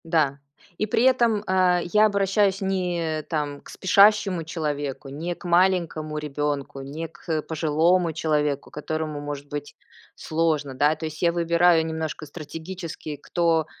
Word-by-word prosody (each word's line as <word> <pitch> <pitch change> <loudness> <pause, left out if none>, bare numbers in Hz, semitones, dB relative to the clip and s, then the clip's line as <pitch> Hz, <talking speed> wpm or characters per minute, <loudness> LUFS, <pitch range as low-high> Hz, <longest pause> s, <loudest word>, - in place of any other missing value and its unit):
Да. 155 -4 +1 0.4
И 215 - 0
при 225 +2 +2
этом, 235 -5 +3
а, 185 -1 +3
я 210 +4 +4
обращаюсь 200 -1 +2
не 175 -5 -1
там 145 -2 -2
к - - -15
спешащему 200 -2 +4
человеку, 145 -4 -4
не 165 +6 -4
к - - -15
маленькому 170 -4 +1
ребёнку, 145 -2 -3
не 150 +5 -5
к, 165 +3 -20
э, 160 -1 +1
пожилому 165 +3 +2
человеку, 150 -3 -1
которому 155 0 -4
может 145 -1 -6
быть 145 0 -6 0.4
сложно, 155 -4 -1
да? 145 +4 +3
То 160 - -6
есть 155 -1 -6
я 170 - +4
выбираю 170 -1 +3
немножко 160 -1 -4
стратегически, 160 +1 -7
кто 165 +1 +1
160 Hz, 145 wpm, -24 LUFS, 150-180 Hz, 0.4 s, я